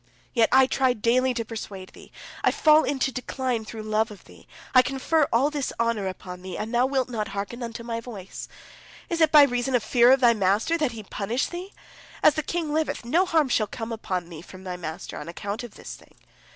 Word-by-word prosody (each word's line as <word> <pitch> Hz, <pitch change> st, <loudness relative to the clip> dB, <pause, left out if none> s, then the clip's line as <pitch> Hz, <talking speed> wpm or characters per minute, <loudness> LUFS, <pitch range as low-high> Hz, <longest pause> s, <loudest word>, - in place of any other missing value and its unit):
Yet 230 Hz, -3 st, +3 dB
I 265 Hz, +1 st, +7 dB
try 260 Hz, -1 st, +2 dB
daily 245 Hz, +3 st, +2 dB
to 230 Hz, -1 st, -2 dB
persuade 205 Hz, -4 st, -7 dB
thee, -, -, -16 dB, 0.3 s
I -, -, +5 dB
fall 310 Hz, 0 st, +5 dB
into 270 Hz, -1 st, 0 dB
decline 250 Hz, -2 st, -3 dB
through 220 Hz, 0 st, -7 dB
love 215 Hz, +1 st, 0 dB
of 210 Hz, -2 st, -12 dB
thee, -, -, -17 dB, 0.3 s
I 255 Hz, -, +8 dB
confer 275 Hz, +3 st, +1 dB
all 270 Hz, +6 st, +3 dB
this 290 Hz, -3 st, -2 dB
honor 230 Hz, -4 st, 0 dB
upon 180 Hz, -1 st, -7 dB
thee, 185 Hz, -1 st, -6 dB
and 220 Hz, +3 st, -5 dB
thou 245 Hz, +2 st, +3 dB
wilt 265 Hz, -2 st, 0 dB
not 220 Hz, -4 st, -3 dB
hearken 200 Hz, +5 st, -5 dB
unto 235 Hz, 0 st, -6 dB
my 230 Hz, -1 st, -3 dB
voice! 210 Hz, -6 st, -8 dB, 0.6 s
Is 335 Hz, -1 st, -1 dB
it 315 Hz, -1 st, +5 dB
by 300 Hz, -2 st, +9 dB
reason 245 Hz, -1 st, +1 dB
of 240 Hz, -, +1 dB
fear 240 Hz, +2 st, +5 dB
of 265 Hz, -, +5 dB
thy 240 Hz, -2 st, +5 dB
master, 210 Hz, -, +1 dB
that 300 Hz, -7 st, 0 dB
he 220 Hz, -2 st, -8 dB
punish 215 Hz, +5 st, -2 dB
thee? 360 Hz, +3 st, -7 dB, 0.5 s
As 305 Hz, -, +7 dB
the 310 Hz, -, -1 dB
king 315 Hz, 0 st, -3 dB
liveth, 310 Hz, -5 st, -1 dB
no 340 Hz, +10 st, +2 dB
harm 320 Hz, -4 st, +3 dB
shall 220 Hz, -4 st, +1 dB
come 225 Hz, +2 st, -6 dB
upon 185 Hz, -6 st, -3 dB
thee 160 Hz, -3 st, -9 dB
from 185 Hz, +1 st, -13 dB
thy 180 Hz, -1 st, -5 dB
master 170 Hz, 0 st, -7 dB
on 150 Hz, -, -8 dB
account 200 Hz, +5 st, -5 dB
of 240 Hz, -, -10 dB
this -, -, -9 dB
thing. -, -, -16 dB
235 Hz, 220 wpm, -25 LUFS, 210-270 Hz, 0.6 s, by